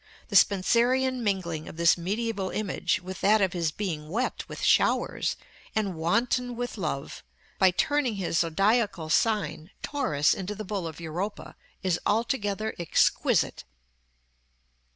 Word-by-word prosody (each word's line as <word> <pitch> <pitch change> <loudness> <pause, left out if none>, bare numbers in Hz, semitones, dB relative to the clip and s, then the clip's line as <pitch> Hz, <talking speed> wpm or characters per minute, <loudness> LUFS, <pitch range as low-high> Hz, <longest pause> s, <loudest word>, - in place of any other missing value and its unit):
The 205 - -4
Spenserian 240 +7 +3
mingling 175 -6 -2
of - - -11
this 170 -1 +5
mediæval 200 +2 -2
image 210 -3 -1
with 185 +1 -7
that 215 +2 +5
of 190 -3 +1
his 170 -3 0
being 155 -5 -4
wet 235 +9 -2
with - - -7
showers, - - +2 0.4
and 210 -3 0
wanton 235 +9 0
with 245 +1 -4
love, 155 -8 -4 0.4
by 190 - +6
turning 285 - +1
his 175 -4 -1
zodiacal 195 0 +1
sign, 185 -7 +1
Taurus, 150 - +1
into 195 +2 -4
the 215 +1 -6
bull 190 -3 -3
of 160 0 -8
Europa, 175 +6 -5 0.3
is 180 -2 +1
altogether 220 -2 0
exquisite. 170 - +2
195 Hz, 130 wpm, -27 LUFS, 170-225 Hz, 0.4 s, by